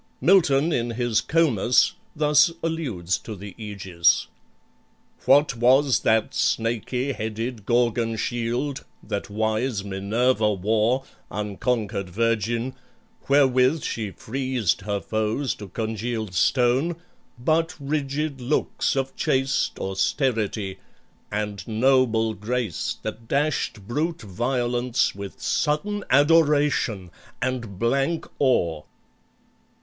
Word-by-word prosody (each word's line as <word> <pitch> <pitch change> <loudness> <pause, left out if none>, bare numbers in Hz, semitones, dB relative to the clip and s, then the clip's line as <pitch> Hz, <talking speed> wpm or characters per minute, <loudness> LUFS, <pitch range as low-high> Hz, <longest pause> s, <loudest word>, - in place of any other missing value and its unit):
Milton, 165 -4 +4
in 120 -2 0
his 115 -1 0
"Comus," 135 - +3 0.2
thus 150 +2 +4
alludes 125 - -1
to 110 - -8
the 100 0 -9
Aegis: 95 -6 +1 1.0
"What 145 -2 +5
was 130 +2 +4
that 110 0 +1
snaky 120 +4 0
headed 110 -1 -4
Gorgon 120 -1 +1
shield 120 +5 -2 0.2
That 100 - -4
wise 110 +1 -1
Minerva 105 +3 +1
wore, 110 +6 +1 0.3
unconquered 105 -1 -2
virgin, 115 +4 0 0.6
Wherewith 135 +1 +4
she 110 -3 -3
freezed 125 -3 -2
her 100 0 -2
foes 110 +7 -1
to 105 - -9
congealed 110 0 -3
stone, 125 - +2 0.4
But 160 +7 +1
rigid 140 0 -2
looks 135 +2 0
of 135 0 -2
chaste 135 -3 0
austerity, 105 -1 -1 0.5
And 105 -1 -3
noble 115 -1 +2
grace 110 -2 -3
that 110 +1 -6
dashed 140 -8 -1
brute 155 +4 -2
violence 120 +4 0
With 100 +4 -8
sudden 155 +11 0
adoration 145 - +3 0.3
and 120 -6 -3
blank 135 - 0
awe!" 85 - +2
120 Hz, 100 wpm, -24 LUFS, 105-135 Hz, 1.0 s, What